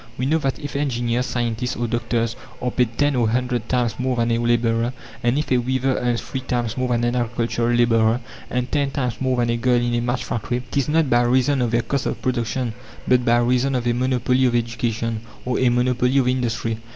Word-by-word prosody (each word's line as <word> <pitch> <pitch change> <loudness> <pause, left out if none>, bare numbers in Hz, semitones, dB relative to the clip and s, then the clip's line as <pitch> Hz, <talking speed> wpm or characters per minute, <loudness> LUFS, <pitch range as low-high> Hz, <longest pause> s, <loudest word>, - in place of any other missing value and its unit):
We 125 - -1
know 155 +4 +2
that 135 -3 -1
if 145 -2 -7
engineers, 125 -3 0
scientists, 120 0 -2
or 120 - -2
doctors 115 0 -1 0.2
are 125 - -2
paid 120 -2 0
ten 145 -1 +2
or 120 -3 +2
a - - 0
hundred 125 -1 -1
times 120 -4 0
more 130 0 0
than 115 0 +1
a 115 - +1
labourer, 120 0 +1 0.3
and 120 +2 +1
if 150 - -2
a 125 - +4
weaver 130 +1 0
earns 120 -1 0
three 135 - -4
times 120 -3 -2
more 130 -1 -1
than 120 -1 +1
an 120 +1 +1
agricultural 120 0 0
labourer, 115 -1 +3 0.3
and 125 0 -2
ten 140 -2 +1
times 125 -4 -3
more 130 -1 +1
than 120 -1 +1
a 120 - 0
girl 125 +1 +2
in 120 0 -1
a 120 - +1
match 120 +1 -1
factory, 120 +2 -3
it - - -9
is 140 0 +1
not 160 0 +3
by 120 0 +5
reason 130 +3 +2
of 120 - +1
their 115 0 +1
"cost 140 -1 -1
of - - -3
production," 120 -1 -1 0.3
but 125 -1 +4
by 120 0 +4
reason 125 +3 +2
of 125 -1 -1
a 120 - +2
monopoly 130 +1 +1
of 120 - 0
education, 115 -1 -1 0.2
or 125 0 0
a 130 - +4
monopoly 125 +1 +2
of 130 -2 +3
industry. 115 -3 -1
120 Hz, 230 wpm, -22 LUFS, 120-130 Hz, 0.3 s, by